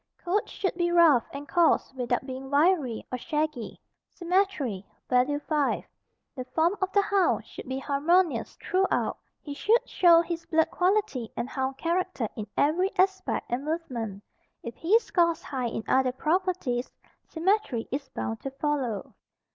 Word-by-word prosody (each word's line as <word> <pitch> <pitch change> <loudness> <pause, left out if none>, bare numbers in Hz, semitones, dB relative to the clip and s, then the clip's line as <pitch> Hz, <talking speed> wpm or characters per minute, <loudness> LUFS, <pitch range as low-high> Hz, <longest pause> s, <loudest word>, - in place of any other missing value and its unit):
Coat 390 +4 -1
should 380 - -2
be 345 0 0
rough 325 -9 +5
and 285 +1 -7
course 340 -5 +2
without 250 0 -1
being 265 0 -7
wiry 290 -5 +2
or 255 - -3
shaggy. 300 -4 -3 0.3
Symmetry 345 - -1 0.2
(value 255 +3 +2
5). 295 -2 0 0.5
The 255 - -4
form 325 +8 +1
of 380 0 0
the 405 - +3
hound 400 -3 +1
should - - -10
be 260 - -2
harmonious 290 -1 +1
thruout. 380 +2 0 0.3
He 290 - -6
should 440 +11 +2
show 340 -2 +6
his 335 -1 -4
blood 320 0 +2
quality 365 - 0
and 235 - -2
hound 265 0 -3
character 345 -7 -1
in 215 -1 -5
every 345 +6 +2
aspect 380 0 +1
and 245 +3 -1
movement. 240 - -4 0.4
If 235 - -6
he 365 - +3
scores 340 -7 +1
high 255 -3 -3
in 225 -1 -4
other 260 -1 +2
properties, 310 -5 -1 0.4
symmetry 335 - 0
is 275 0 -4
bound 225 0 -4
to 270 - -5
follow. 270 -6 -2
300 Hz, 150 wpm, -27 LUFS, 255-355 Hz, 0.5 s, show